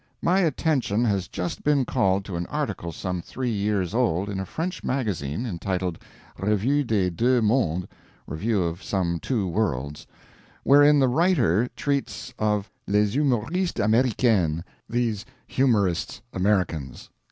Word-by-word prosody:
My 185 +3 +3
attention 140 - +1
has 100 -5 0
just 85 -3 -4
been 145 -3 +3
called 100 -7 +1
to 95 - -5
an 85 0 -3
article 85 - -3
some 90 +1 -4
three 125 +7 -3
years 100 -4 -1
old 105 -6 +1
in 100 -2 -3
a 95 - -4
French 175 - -4
Magazine 105 - -2
entitled, 90 -3 -3 0.4
'Revue 105 +9 +1
des 100 -7 +1
Deux 125 +8 +2
Mondes' 105 -7 +1 0.4
(Review 100 +6 -1
of 85 +2 -3
Some 85 -4 -1
Two 110 -4 -1
Worlds), 75 - -2 0.6
wherein 145 +2 +6
the 135 -2 +4
writer 125 - +2
treats 140 -7 -2
of 105 -1 0 0.2
"Les 105 0 +2
Humoristes 145 - 0
Americaines" 110 -7 +2 0.3
(These 115 -3 -1 0.2
Humorists 105 -11 +1
Americans). 90 -8 -1
105 Hz, 130 wpm, -25 LUFS, 90-125 Hz, 0.6 s, wherein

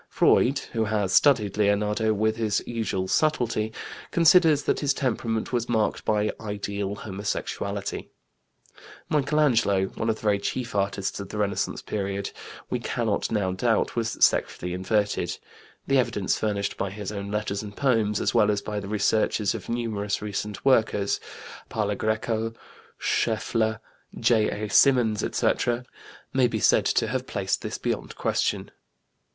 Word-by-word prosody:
Freud, 135 +3 +3 0.2
who 110 -2 +1
has 105 -3 0
studied 110 -9 +4
Leonardo 105 +1 +2
with 110 +1 +1
his 110 -3 0
usual 110 -5 -2
subtlety, 120 -6 +1 0.4
considers 165 -3 +5
that - - +1
his 140 -2 +1
temperament 115 -3 -1
was 120 -1 -1
marked 110 -3 0
by 105 0 +1
"ideal 100 -1 -3
homosexuality." 100 0 -4 1.0
Michelangelo, 135 -10 +2
one 115 - -3
of 110 - +2
the - - -15
very 105 -2 +2
chief 115 +3 -3
artists 100 -1 -1
of 100 -1 -7
the 105 - -6
Renaissance 100 -1 -1
period, 100 -1 -3 0.4
we - - -2
cannot - - -1
now 100 -4 0
doubt, 110 +4 +1
was 115 -1 -1
sexually 90 0 -1
inverted. 100 +3 0 0.5
The 135 -1 +3
evidence 105 -6 0
furnished 100 -2 -2
by 100 - -2
his 105 +1 -6
own 100 -1 -5
letters 105 -1 -2
and 105 -1 -9
poems, 115 -6 +2
as - - 0
well 105 - +4
as 105 -1 0
the 105 -1 -3
researches 105 -1 +1
of 110 -5 -7
numerous 110 -4 -2
recent 105 +1 -5
workers, 110 -6 +3 0.5
Parlagreco, 110 +2 -1 0.4
Scheffler, 110 -1 0 0.4
J.A. 110 -2 +2
Symonds, 120 -3 +4
etc., 120 +1 0 0.5
may 130 -2 +4
be 115 -2 -2
said - - +4
to - - +2
have - - -2
placed - - -1
this - - -4
beyond - - -3
question. - - -1
110 Hz, 140 wpm, -26 LUFS, 100-115 Hz, 1.0 s, considers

